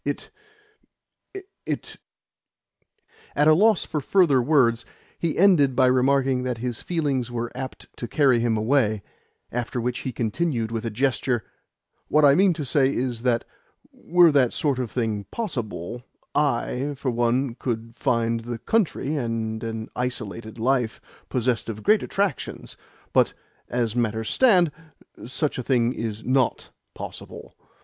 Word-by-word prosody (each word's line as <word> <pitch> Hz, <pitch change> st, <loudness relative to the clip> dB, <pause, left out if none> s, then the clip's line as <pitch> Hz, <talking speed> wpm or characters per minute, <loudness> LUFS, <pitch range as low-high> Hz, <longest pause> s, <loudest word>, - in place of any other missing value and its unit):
It, -, -, -4 dB, 1.3 s
it -, -, -5 dB, 0.7 s
" 450 Hz, 0 st, -32 dB
At 150 Hz, -, +3 dB
a 155 Hz, -, +8 dB
loss 210 Hz, +4 st, +4 dB
for 150 Hz, -, -3 dB
further 150 Hz, -4 st, +4 dB
words, 120 Hz, -4 st, +3 dB, 0.4 s
he 165 Hz, -3 st, -1 dB
ended 165 Hz, -9 st, +5 dB
by 130 Hz, 0 st, +4 dB
remarking 130 Hz, +1 st, +3 dB
that 125 Hz, -2 st, -2 dB
his 120 Hz, 0 st, -4 dB
feelings 140 Hz, -8 st, -1 dB
were 120 Hz, -1 st, -3 dB
apt 130 Hz, 0 st, -7 dB
to 120 Hz, -, -5 dB
carry 135 Hz, -4 st, +3 dB
him 115 Hz, -1 st, +1 dB
away; 110 Hz, -3 st, +1 dB, 0.5 s
after 120 Hz, +1 st, -3 dB
which 120 Hz, +1 st, -2 dB
he 130 Hz, -, -4 dB
continued 115 Hz, 0 st, -1 dB
with 115 Hz, 0 st, -3 dB
a -, -, 0 dB
gesture: 120 Hz, 0 st, 0 dB, 0.6 s
"What 150 Hz, 0 st, +4 dB
I 140 Hz, -, +7 dB
mean 185 Hz, +2 st, +4 dB
is 130 Hz, -4 st, 0 dB
that, 120 Hz, -2 st, +1 dB, 0.5 s
were 175 Hz, -1 st, +4 dB
that 135 Hz, -4 st, +3 dB
sort 140 Hz, -4 st, 0 dB
of 125 Hz, -3 st, -2 dB
thing 110 Hz, -4 st, -2 dB
possible, 120 Hz, -, -4 dB, 0.3 s
I, 140 Hz, 0 st, 0 dB
for 130 Hz, -1 st, -1 dB
one, 120 Hz, +2 st, +1 dB
could 115 Hz, -2 st, -4 dB
find 115 Hz, -4 st, 0 dB
the 120 Hz, +1 st, -5 dB
country 155 Hz, -, 0 dB
and 115 Hz, -4 st, -2 dB
an 110 Hz, -1 st, -4 dB
isolated 115 Hz, -3 st, -4 dB
life 120 Hz, -1 st, 0 dB, 0.3 s
possessed 120 Hz, -2 st, 0 dB
of 110 Hz, -1 st, -6 dB
great 215 Hz, -1 st, +4 dB
attractions. 200 Hz, -1 st, -2 dB, 0.4 s
But, -, -, +3 dB, 0.3 s
as 120 Hz, -2 st, -1 dB
matters 110 Hz, -2 st, -1 dB
stand, 185 Hz, -, +4 dB, 0.6 s
such 140 Hz, +2 st, -2 dB
a -, -, -3 dB
thing 120 Hz, -1 st, +2 dB
is 110 Hz, -2 st, -4 dB
NOT 130 Hz, -1 st, 0 dB, 0.2 s
possible. -, -, -9 dB
125 Hz, 140 wpm, -24 LUFS, 115-145 Hz, 1.3 s, a